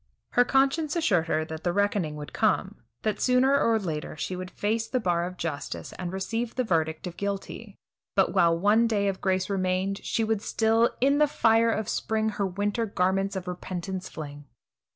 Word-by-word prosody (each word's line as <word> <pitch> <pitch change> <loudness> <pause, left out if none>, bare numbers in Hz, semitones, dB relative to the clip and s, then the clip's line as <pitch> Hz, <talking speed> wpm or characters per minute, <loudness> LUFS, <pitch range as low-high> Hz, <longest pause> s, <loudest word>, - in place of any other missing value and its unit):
Her 245 - +5
conscience 275 +5 +2
assured 195 - +2
her 155 -1 0
that 160 0 -7
the 175 - +1
reckoning 200 -5 0
would 150 -1 -8
come, 210 -2 +1 0.3
that 215 -1 -1
sooner 260 +2 +4
or 230 -1 +3
later 160 -7 -4
she 185 - -3
would 185 0 -6
face 220 +4 -1
the 255 +2 0
bar 175 -5 +1
of 180 0 -9
justice 150 -4 -5
and 180 -1 -5
receive 225 +5 -3
the 255 - +1
verdict 160 -6 0
of 175 -1 -7
guilty; 200 -1 -5 0.4
but - - +3
while 170 -1 +4
one 210 +6 +4
day 205 -3 +1
of 195 -1 -2
grace 190 -1 +1
remained, 190 0 -1
she 225 - 0
would 220 -2 0
still 225 +1 +2
"in 280 +3 +4
the 300 - +5
fire 230 -4 +3
of 220 -2 -1
spring, 220 0 0
her 205 -2 -1
winter 205 +4 -1
garments 195 0 0
of 185 -1 -5
repentance 180 +1 -5
fling." 145 -2 -8
200 Hz, 190 wpm, -27 LUFS, 180-225 Hz, 0.4 s, Her